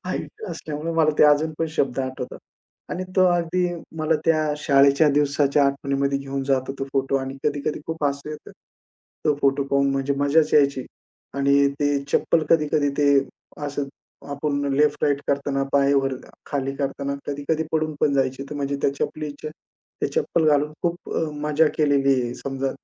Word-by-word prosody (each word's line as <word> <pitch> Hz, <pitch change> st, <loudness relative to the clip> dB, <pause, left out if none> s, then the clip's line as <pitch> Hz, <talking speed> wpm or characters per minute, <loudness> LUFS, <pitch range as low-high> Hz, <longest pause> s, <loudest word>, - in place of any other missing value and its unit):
Height 440 Hz, -, -5 dB
असल्यामुळे 155 Hz, +2 st, -5 dB
मला 160 Hz, -2 st, +3 dB
ते -, -, +7 dB
अजून 150 Hz, +2 st, +4 dB
पण 165 Hz, -, 0 dB
शब्द 135 Hz, -2 st, 0 dB
आठवतात. 130 Hz, -1 st, -5 dB, 0.5 s
आणि 185 Hz, -, -4 dB
तो 185 Hz, -, +6 dB
अगदी 175 Hz, 0 st, +1 dB, 0.3 s
मला 155 Hz, +1 st, +1 dB
त्या 155 Hz, -1 st, +3 dB
शाळेच्या 140 Hz, +1 st, +4 dB
दिवसाच्या 145 Hz, 0 st, +2 dB
आठवणीमध्ये 140 Hz, 0 st, 0 dB
घेऊन 135 Hz, 0 st, -4 dB
जातो 135 Hz, -1 st, 0 dB
तो 135 Hz, -, -2 dB
फोटो 135 Hz, 0 st, +1 dB
आणि 135 Hz, 0 st, -4 dB
कधी-कधी 150 Hz, 0 st, -1 dB
खूप 160 Hz, -2 st, -3 dB
हसू 140 Hz, +1 st, -2 dB
येतं. 155 Hz, -, -9 dB, 0.7 s
तो 150 Hz, -, +3 dB
फोटो 140 Hz, 0 st, +2 dB
पाहून 140 Hz, 0 st, +3 dB
म्हणजे 135 Hz, +1 st, 0 dB
मजाच 150 Hz, +2 st, +3 dB
यायची. 140 Hz, -3 st, +3 dB, 0.5 s
आणि 140 Hz, 0 st, +3 dB
ते 145 Hz, -1 st, +2 dB
चप्पल 160 Hz, -2 st, +2 dB
कधी-कधी 150 Hz, -2 st, +3 dB
ते 145 Hz, -1 st, +4 dB, 0.6 s
असं 145 Hz, 0 st, -3 dB, 0.5 s
आपण 145 Hz, 0 st, -2 dB
लेफ्ट-राइट 145 Hz, -1 st, +2 dB
करतांना, 140 Hz, -1 st, 0 dB
पाय 140 Hz, 0 st, +4 dB
वर-खाली 135 Hz, 0 st, -3 dB
करतांना, 140 Hz, 0 st, -2 dB
कधी-कधी 145 Hz, +3 st, -1 dB
पडून 155 Hz, -1 st, 0 dB
पण 140 Hz, -, +3 dB
जायची, 135 Hz, 0 st, 0 dB
तर -, -, -5 dB
म्हणजे 140 Hz, 0 st, -2 dB
त्या 140 Hz, -, +2 dB
चपलीच्या 150 Hz, +1 st, -4 dB, 0.5 s
ते -, -, +3 dB
चप्पल 170 Hz, -, 0 dB
घालून 150 Hz, 0 st, +2 dB
खूप 175 Hz, 0 st, -3 dB
अ, -, -, +1 dB, 0.2 s
मजा 150 Hz, +1 st, +3 dB
केलेली 140 Hz, -2 st, +3 dB
आहे, 120 Hz, 0 st, -3 dB
समजा 135 Hz, 0 st, -3 dB
145 Hz, 160 wpm, -23 LUFS, 140-150 Hz, 0.7 s, ते